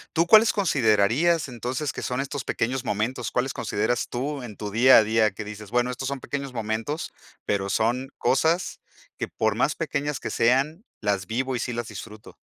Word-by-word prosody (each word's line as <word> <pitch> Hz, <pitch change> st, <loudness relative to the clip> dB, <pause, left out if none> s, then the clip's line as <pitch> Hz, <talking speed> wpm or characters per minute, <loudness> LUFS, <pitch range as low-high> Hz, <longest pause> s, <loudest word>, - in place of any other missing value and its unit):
¿Tú 165 Hz, +1 st, +4 dB
cuáles 215 Hz, +5 st, +7 dB
considerarías 145 Hz, -, +2 dB
entonces, 125 Hz, +3 st, -3 dB
que -, -, -6 dB
son 125 Hz, +1 st, -2 dB
estos 140 Hz, -1 st, -4 dB
pequeños 125 Hz, +3 st, -1 dB
momentos? 115 Hz, +1 st, -2 dB
¿Cuáles 130 Hz, +2 st, 0 dB
consideras 110 Hz, +4 st, -1 dB
tú 140 Hz, +3 st, -3 dB
en 115 Hz, -5 st, -9 dB
tu 105 Hz, -1 st, -5 dB
día 125 Hz, +5 st, +7 dB
a 110 Hz, -, +7 dB
día?, 110 Hz, 0 st, +2 dB
que 100 Hz, +3 st, -7 dB
dices: 105 Hz, 0 st, -9 dB
"Bueno, 120 Hz, +2 st, +1 dB
estos 130 Hz, +2 st, -4 dB
son 140 Hz, 0 st, -3 dB
pequeños 140 Hz, 0 st, -5 dB
momentos, 115 Hz, +6 st, -3 dB, 0.3 s
pero 100 Hz, -1 st, -1 dB
son 120 Hz, +6 st, 0 dB
cosas 160 Hz, +6 st, +1 dB, 0.4 s
que -, -, -3 dB
por -, -, 0 dB
más -, -, +1 dB
pequeñas 145 Hz, 0 st, -2 dB
que -, -, -5 dB
sean 135 Hz, -, +2 dB, 0.2 s
las 100 Hz, -3 st, -1 dB
vivo 130 Hz, +4 st, -1 dB
y -, -, -2 dB
sí 125 Hz, -, -2 dB
las 120 Hz, -1 st, -4 dB
disfruto". 105 Hz, 0 st, -10 dB
125 Hz, 185 wpm, -25 LUFS, 110-140 Hz, 0.4 s, cuáles